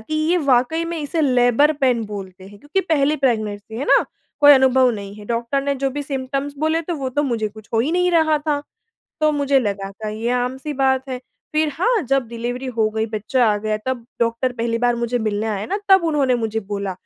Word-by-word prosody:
कि 220 +8 -6 0.2
ये 360 - +4
वाक़ई 280 +3 +2
में 335 0 -4
इसे 305 +2 -2
लेबर 255 +2 +4
पेन 245 -3 +2
बोलते 190 -2 -8
हैं, 205 0 -14
क्योंकि 295 - -1
पहली 305 -4 +1
प्रेगनेंसी, 220 -5 -1
है 270 - -3
ना? - - +5 0.4
कोई 290 0 +9
अनुभव 260 -1 +5
नहीं 200 -1 -7
है, 210 0 -11
डॉक्टर 235 +4 -1
ने 280 0 0
जो 270 0 -1
भी 290 +2 -4
सिम्पटम्स 275 0 -3
बोले 315 +1 +1
तो 345 - 0
वो 265 -2 -3
तो 290 +3 0
मुझे 230 -6 -1
कुछ 215 +1 -15
हो 225 - +3
ही 280 +8 0
नहीं 360 0 +2
रहा 315 -2 +3
था, 295 -1 -1 0.6
तो 310 - +4
मुझे 280 -1 +2
लगा 200 -3 -3
था 215 +2 -7
ये 220 +3 -3
आम-सी 265 +4 -5
बात 265 0 +1
है। 250 -1 -4 0.3
फिर 310 0 +2
हाँ, 445 +4 +1
जब 275 -2 0
डिलिवरी 240 +3 -4
हो 220 -2 +2
गई, 220 0 -1
बच्चा 225 +4 0
आ - - 0
गया, 215 0 -1
तब 255 -3 -2 0.2
डॉक्टर 235 +2 0
पहली 230 0 0
बार 240 0 +2
मुझे 235 +1 -1
मिलने 215 -1 -1
आया 210 -2 -2
ना, 400 - -2
तब 380 -2 +6
उन्होंने 285 -6 +2
मुझे 225 -2 -2
बोला 200 -1 -3
255 Hz, 220 wpm, -20 LUFS, 220-290 Hz, 0.6 s, कोई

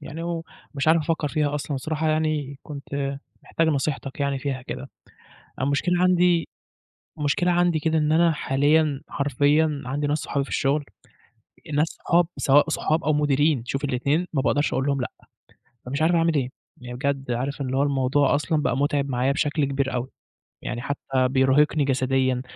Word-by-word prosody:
يعني 155 +2 -7
ومش 165 -3 -4
عارف 165 +1 +6
أفكّر 160 -1 -1
فيها 150 -1 0
أصلًا 145 0 -3
بصراحة، 155 +3 -2
يعني 155 -3 -1
كنت 140 -1 -5 0.2
محتاج 165 - 0
نصيحتك 140 -2 -2
يعني 140 -1 0
فيها 135 -2 -3
كده. - - -7 0.7
المشكلة 145 +7 +1
عندي 180 -2 +3 0.7
مشكلة 150 +4 +1
عندي 175 -2 +2
كده 160 +1 +1
إن 150 0 +1
أنا 165 +1 +4
حاليًا 145 0 +2
حرفيًا 145 +2 +1
عندي 140 +4 -2
ناس 145 +1 0
صحابي 140 -2 -2
في - - -12
الشُغل، 145 +1 +1 0.9
ناس 150 +3 +2
صحاب 170 +1 +1
سواء 145 +3 +4
صحاب 155 +1 0
أو 155 - +2
مديرين، 145 -2 +2
شوف 135 +3 -3
الاتنين 145 +6 0
ما 135 - +1
باقدرش 140 +4 +1
أقول 130 +1 0
لهم 140 -2 0
لأ، - - -4 0.7
فمش 140 +4 -3
عارف 170 +2 +3
أعمل 165 0 +2
إيه. 130 -3 0 0.3
يعني 125 0 -7
بجد 135 0 -2
عارف 135 +4 -2
اللي 130 -1 -2
هو 140 - +3
الموضوع 140 0 +2
أصلًا 150 +1 0
بقى 125 - 0
مُتعب 140 0 0
معايا 130 +1 +1
بشكل 145 0 0
كبير 135 -1 -1
أوي. 125 +1 -2 0.5
يعني 120 0 -4
حتّى 140 +2 -4 0.3
بيرهقني 135 +3 +3
جسديًا، 130 -1 +1
145 Hz, 165 wpm, -24 LUFS, 135-155 Hz, 0.9 s, عارف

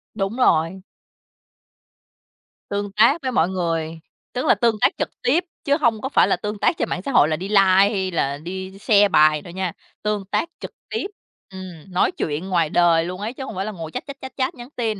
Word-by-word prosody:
Đúng 200 +2 -2
rồi. 175 -5 +2 1.9
Tương 205 0 -3
tác 230 +10 +4
với 260 -1 -2
mọi 180 -7 +2
người, 165 -3 -2 0.3
tức 250 - -2
là - - +5
tương 235 -3 +2
tác - - +4
trực - - -1
tiếp, 335 +8 +2 0.2
chứ 285 +1 +2
hông 225 -4 +2
có 265 - -3
phải - - +4
là - - +2
tương 210 0 -5
tác 325 - +2
trên - - -1
mạng 180 - -2
xã 275 - -4
hội 155 - +5
là 155 - 0
đi 185 +5 -5
like 210 - +5
hay 190 0 +3
là 140 -4 -1
đi 190 +4 -7
share 205 -1 +5
bài 155 -3 +4
đâu 175 +2 -11
nha, 190 -2 -2 0.3
tương 210 -2 -1
tác 330 - -1
trực - - -7 0.2
tiếp, 440 -3 -2 0.4
ừm, 185 -2 -10
nói 180 - +2
chuyện 160 +3 -3
ngoài 170 -4 +2
đời 165 -1 +3
luôn 180 +2 -6
ấy, 220 +3 -3
chứ 265 - -7
hông 265 - -7
phải 190 +1 -2
là 215 - -3
ngồi 165 -5 -7
chat, - - -5
chat, 280 -1 -8
chat, 265 -1 -8
chat, 260 -1 -1
nhắn 240 0 -10
tin. 220 -4 -2
195 Hz, 225 wpm, -22 LUFS, 175-230 Hz, 1.9 s, là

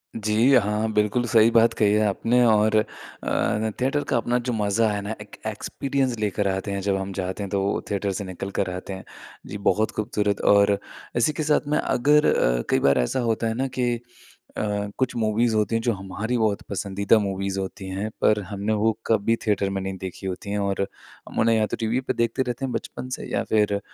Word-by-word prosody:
जी 110 +4 +3
हाँ, 105 -1 +1
बिल्कुल 105 +3 +1
सही 115 0 +6
बात 115 0 +5
कही 105 -3 +2
है 105 0 +3
आपने, 115 +5 +2
और 110 -1 +4
अ, 110 0 -2
थिएटर 140 +3 +1
का - - +2
अपना 120 +1 +1
जो - - 0
मज़ा 110 +1 +1
है 105 -1 -2
ना, 105 +3 -4
एक 105 - -11
एक्सपीरियंस 130 +4 -2
लेकर 105 -1 0
आते 95 +1 -4
हैं। 100 0 -2
जब 100 0 +1
हम 95 0 -4
जाते 95 +2 -3
हैं, 100 - -5
तो 100 -1 0
वो 100 +1 0
थिएटर 100 0 0
से - - -3
निकलकर 95 +1 -3
आते 90 +2 -6
हैं। 95 - -7 0.4
जी 105 - -5
बहुत 110 +1 +1
ख़ूबसूरत 105 -2 -1
और 100 0 +4 0.4
इसी 120 +6 +2
के 155 - -2
साथ 150 -1 +1
में 150 +1 +1
अगर 150 +4 +3
अ, - - +2
कई - - +3
बार 70 0 +3
ऐसा - - 0
होता 115 0 0
है 110 - 0
ना, 130 +4 -1
कि 125 -2 0 0.6
अ, - - -1 0.3
कुछ 130 -2 0
मूवीज़ 110 +1 +1
होती 110 +1 +1
हैं 115 - +1
जो 120 - +1
हमारी 100 +5 -3
बहुत 110 -3 +1
पसंदीदा 100 +2 +1
मूवीज़ 95 -1 -2
होती 95 0 -5
हैं, 100 +3 -3
पर 105 -1 +4
हमने 100 +3 -2
वो 110 +1 +2 0.2
कभी 115 0 +2
थिएटर 100 -2 +1
में 95 0 -2
नहीं 95 0 -4
देखी 95 +1 -6
होती 95 +2 -5
हैं, 105 - -1
और 100 -1 -1 0.5
हम - - -4
उन्हें 115 +1 +4
या 110 - +3
तो - - -4
टीवी 115 +2 0
पर 130 - -2
देखते 115 +3 0
रहते 125 +2 -3
हैं 130 - -3
बचपन 115 +2 -5
से - - -8
या - - 0
फिर 105 -1 +3
अ, - - -1
105 Hz, 220 wpm, -24 LUFS, 100-115 Hz, 0.6 s, सही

